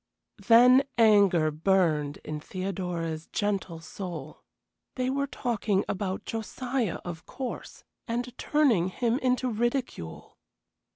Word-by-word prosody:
Then 250 +3 +7
anger 200 -8 +5
burned 155 -3 +1
in 155 -1 -4
Theodora's 175 -3 -4
gentle 195 -5 -2
soul. 165 -3 -7 0.5
They 255 0 0
were 280 +1 -1
talking 225 -7 -1
about 190 -1 -3
Josiah, 235 -1 -2
of 170 -2 -7
course, 260 -2 -7 0.2
and 240 +1 -3
turning 255 - +3
him 235 +6 0
into 255 -1 +1
ridicule. 240 - -3
205 Hz, 105 wpm, -28 LUFS, 170-245 Hz, 0.5 s, Then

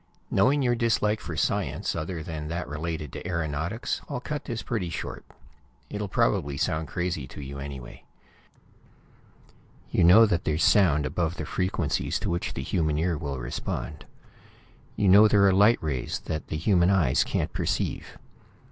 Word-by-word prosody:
Knowing 140 +2 +3
your 120 -1 +3
dislike 110 -2 +1
for - - -6
science - - -1
other 85 0 -4
than 80 -3 -5
that 85 +1 -4
related 75 -1 -4
to - - -6
aeronautics, 85 +4 -2
I'll - - -3
cut 145 +2 -5
this 115 -2 -4
pretty 105 -8 -2
short. 85 - -6 0.7
It'll 105 0 -3
probably 70 -5 +1
sound 80 +3 -1
crazy 90 -6 -3
to 70 - -11
you, 70 0 -7
anyway. 70 -3 -8 1.9
You - - +2
know 95 +7 +8
that 90 -5 0
there's 80 +1 0
sound 75 -8 +4
above 80 +5 -1
the 80 - -4
frequencies 90 +4 -1
to - - -1
which 85 - -2
the 65 - -3
human 80 -1 0
ear 85 +2 +1
will 70 -3 -4
respond. - - -5 0.9
You 100 - +1
know 100 +3 +8
there 100 -1 +4
are 95 - +4
light 105 +5 +5
rays 65 -6 -2
that 80 - -4
the 80 - -3
human 85 +2 +3
eyes 90 -10 +3
can't - - -2
perceive. - - -2
85 Hz, 160 wpm, -26 LUFS, 75-100 Hz, 1.9 s, know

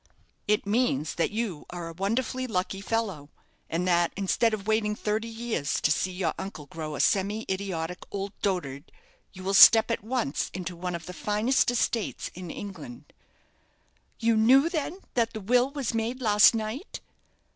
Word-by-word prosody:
"It 210 0 +2
means 200 - +1
that 170 - 0
you 210 -8 -4
are 175 -1 -6
a - - -8
wonderfully 235 +8 -1
lucky 195 -2 -2
fellow; 200 -10 -2 0.4
and 175 +3 -1
that, 175 -1 +3
instead 200 +4 +2
of 210 -2 -4
waiting 215 -1 +1
thirty 215 +2 -2
years 225 -10 -2
to 155 - +2
see 185 - +1
your 180 -1 -1
uncle 190 -6 -7
grow 155 +1 -6
a - - -6
semi 205 +3 +1
idiotic 180 -3 -3
old 200 0 -4
dotard, 145 -9 -2 0.4
you 185 -1 -11
will 195 +1 -1
step 225 +3 +8
at 230 - -2
once 225 - -1
into 180 -1 -5
one 180 +1 -4
of 170 -1 -7
the 180 - -7
finest 210 +8 +1
estates 240 -2 -1
in 180 -1 -8
England." 200 +7 -9 1.0
"You 230 -1 +2
knew, 260 +8 +5
then, 335 +3 -3
that 230 -1 +1
the 220 - -5
will 245 +5 +2
was 280 -5 -3
made 230 +3 -2
last 215 -2 +6
night?" 225 - -4
205 Hz, 170 wpm, -27 LUFS, 180-230 Hz, 1.0 s, step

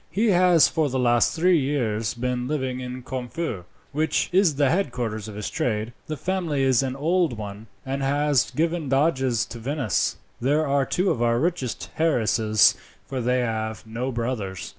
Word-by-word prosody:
He 215 +2 +2
has 180 -4 +5
for 155 -3 0
the 130 - -2
last 120 -2 +3
three 175 +1 +4
years 115 -7 -1
been 125 0 -2
living 130 -3 -2
in 125 0 -6
Corfu, 125 - -4 0.3
which 155 +3 0
is 180 -4 +3
the 140 -1 +2
headquarters 120 - -2
of 105 - -8
his 105 -1 -4
trade. 115 -7 -2
The 155 - -4
family 170 -5 -1
is 130 -2 +4
an 130 -1 -2
old 160 -2 +1
one, 105 +1 -7 0.2
and 135 +1 -3
has 145 -1 +2
given 165 -2 -1
doges 135 -5 +2
to 115 - -9
Venice. 130 - -1 0.3
They 135 +4 +2
are 140 -3 +1
two 185 +2 +1
of 120 - -2
our 120 0 +2
richest 155 -4 -2
heiresses, 110 -8 +3 0.3
for 130 -2 -4
they 125 +1 +1
have 110 -2 -3
no 120 +4 -3
brothers. 115 -6 -3
130 Hz, 170 wpm, -24 LUFS, 115-155 Hz, 0.3 s, has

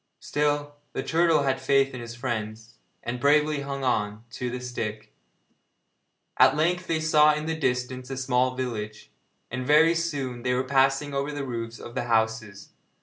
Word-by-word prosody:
Still, 145 0 -1 0.2
the - - -3
turtle 165 -2 +3
had 130 -1 0
faith 135 0 +2
in 125 - -6
his 115 0 -8
friends, 115 -2 -5 0.2
and 120 +1 -4
bravely 150 +2 +3
hung 140 -1 -5
on 105 -3 -1
to 125 0 -4
the 125 +1 -4
stick. 110 -4 -5 1.2
At - - +6
length 180 +4 +1
they 160 -1 0
saw 155 -1 +5
in 150 0 -4
the 160 - -1
distance 125 -3 -2
a 135 - -4
small 130 0 +1
village, 110 -4 -5 0.4
and 125 +1 -3
very 155 +5 +5
soon 140 -7 -3
they 125 +1 0
were 130 - +1
passing 135 +2 +2
over 140 +1 -1
the 145 -1 -4
roofs 115 -2 -5
of 120 - -10
the 120 - -2
houses. 110 -3 -1
130 Hz, 170 wpm, -26 LUFS, 120-145 Hz, 1.2 s, At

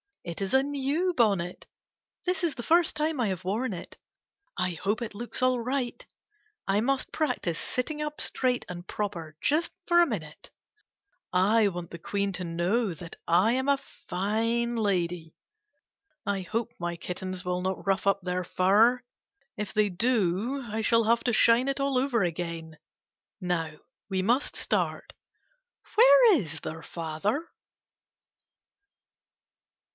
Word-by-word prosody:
It 170 +2 -6
is 195 +3 -2
a 265 0 +5
new 290 +6 0
bonnet. 195 - +1 0.6
This 365 0 -1
is 330 -4 +1
the 240 - -6
first 335 +3 +3
time 305 -1 -1
I 235 - +2
have 185 -2 -3
worn 215 +7 -1
it. 175 - -9 0.6
I 180 -1 +1
hope 195 +7 -1
it 230 -3 -4
looks 235 +3 -3
all 255 -1 +3
right. 250 +1 -2 0.6
I 195 +1 +3
must 265 +4 0
practice 250 - -1
sitting 295 +4 -3
up 300 0 -4
straight 250 -1 0
and 175 0 -7
proper 170 -7 -4
just 310 +4 +1
for 345 0 +5
a 345 - +6
minute. - - -6 0.8
I 205 +4 +4
want 175 -2 -6
the 170 - -8
Queen 200 +3 -1
to 180 - -4
know 180 +5 0
that 165 +2 -9
I 185 +7 +4
am 260 +2 0
a 280 0 +4
fine 230 0 -1
lady. 180 -6 -1 0.9
I 200 -1 0
hope 220 +5 -2
my 175 0 -2
kittens 185 +2 -5
will 180 0 -1
not 190 +1 -3
rough 195 0 +1
up 200 0 +3
their 180 0 -2
fur. 215 +8 +3 0.5
If 210 -2 -4
they 210 -1 +3
do 225 +4 0
I 220 +1 -2
shall 230 +1 +4
have 230 +1 +3
to 240 - +2
shine 230 +4 +5
it 275 0 -1
all 275 -1 +1
over 250 -5 +2
again. 165 -2 -4 0.6
Now 175 -4 -1 0.4
we 190 -1 0
must 240 +8 +1
start. - - -1 0.8
Where - - +7
is 165 - -3
their 160 +1 -6
father 175 - -2
210 Hz, 150 wpm, -28 LUFS, 180-255 Hz, 0.9 s, Where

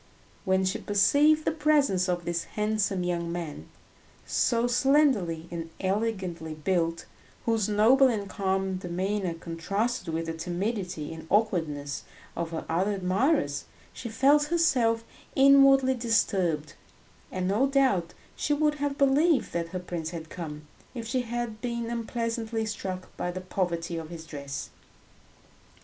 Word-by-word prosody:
When 190 0 +2
she 190 - -1
perceived 290 +10 +4
the - - +2
presence 290 - +2
of 175 -1 -1
this 170 -1 -2
handsome 210 -3 -1
young 170 -1 -1
man, 170 -4 -5 0.6
so 235 -1 +1
slenderly 245 - +2
and 165 -1 -5
elegantly 190 -5 -2
built, 165 +1 -1 0.4
whose 225 -3 +1
noble 235 +6 +5
and 210 -5 -1
calm 190 -1 -1
demeanour 185 0 -2
contrasted 180 +5 -2
with 165 +1 -2
the 165 - -3
timidity 180 -1 -3
and 160 0 -10
awkwardness 160 -9 0 0.3
of 170 -1 -2
her 165 -1 -5
other 185 +5 +1
admirers, 190 - +1 0.3
she 235 - -6
felt 280 +6 +4
herself 260 -9 +2 0.3
inwardly 270 -1 +6
disturbed, 190 - 0 0.6
and 185 0 -2
no 215 +8 +2
doubt 265 -11 +2 0.2
she 295 - 0
would 300 0 +1
have 285 -1 -1
believed 280 +1 +3
that 170 -1 -1
her 185 - -4
prince 175 -3 -4
had 165 -2 -8
come, 150 -4 -7 0.3
if 235 -2 -5
she 250 +2 0
had 240 -2 -4
been 235 -1 -3
unpleasantly 230 -1 -2
struck 190 -3 -5
by 180 - -2
the 180 +1 -4
poverty 175 -2 -2
of 160 -1 -6
his 165 -2 -8
dress. 140 -3 -6
195 Hz, 135 wpm, -28 LUFS, 170-240 Hz, 0.6 s, inwardly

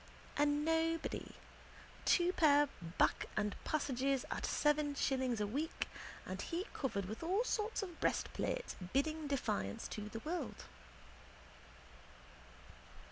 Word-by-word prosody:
A 290 +1 +4
nobody, 325 +2 +1 0.7
two 355 0 +4
pair 290 -4 +5 0.3
back - - +3
and 210 -1 +1
passages, 275 -3 +1
at - - -1
seven 295 -1 +2
shillings 260 -4 +1
a 210 - +2
week, 285 +10 -2 0.4
and - - -4
he 350 +3 -2
covered 225 -8 -1
with 215 +4 -5
all 375 +7 +2
kinds 440 -3 0
of 355 -4 -7
breastplates - - 0 0.2
bidding 310 +3 +1
defiance 100 - -1
to 210 0 -5
the 225 - -5
world. 340 +6 -3
290 Hz, 115 wpm, -37 LUFS, 255-330 Hz, 0.7 s, pair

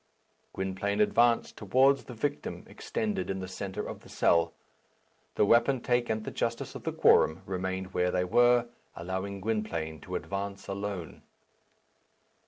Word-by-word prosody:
Gwynplaine 95 +2 -2
advanced 115 +2 +3
towards 130 +7 +3
the 125 - -9
victim 145 +5 -3
extended 220 - -3
in 95 0 -2
the 95 - -5
centre 95 +1 -5
of - - -7
the - - -17
cell. 85 -1 +3 0.8
The - - +4
wapentake 120 +1 +3
and 110 -1 -1
the - - -5
justice 115 0 -2
of - - -9
the - - 0
quorum 80 +4 +4
remained 95 0 -3
where 90 0 +2
they 90 0 +1
were, 120 +5 +4 0.3
allowing 95 +3 -4
Gwynplaine 85 -8 -2
to - - -6
advance 100 0 -4
alone. 100 -3 -5
100 Hz, 140 wpm, -29 LUFS, 95-120 Hz, 0.8 s, The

